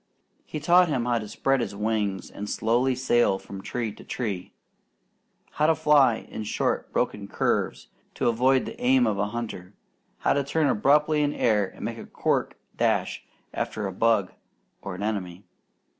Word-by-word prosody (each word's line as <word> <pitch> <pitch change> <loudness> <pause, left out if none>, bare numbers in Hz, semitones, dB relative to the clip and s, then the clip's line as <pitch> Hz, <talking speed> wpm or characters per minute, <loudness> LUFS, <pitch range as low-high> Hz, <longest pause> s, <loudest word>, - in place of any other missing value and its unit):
He 155 - -4
taught 175 +4 +5
him 125 -5 0
how 120 -1 +1
to 105 - -6
spread 135 +6 +1
his 110 - -4
wings 105 -2 -1
and 105 +1 -6
slowly 120 +4 +1
sail 120 -5 +2
from 95 0 -9
tree 115 +2 -3
to - - -14
tree; 100 -7 -4 1.0
how 150 - +1
to 160 - +4
fly 140 -7 +4
in 110 - -6
short 105 - -1
broken - - -1
curves, - - -1 0.3
to - - 0
avoid 130 +3 +3
the 235 - -8
aim 255 0 +4
of 100 - 0
a 100 - +1
hunter; 105 -4 -6 0.4
how - - +2
to 140 - +1
turn 155 +3 0
abruptly 150 +5 +3
in 145 0 +1
air 105 -4 +2
and - - -9
make - - -4
a - - -9
quick - - -1 0.2
dash - - 0 0.3
after 110 - -3
a 95 - -3
bug 105 -2 +2 0.5
or 95 - -6
an 95 - -5
enemy. 100 -3 -3
115 Hz, 175 wpm, -26 LUFS, 105-140 Hz, 1.0 s, taught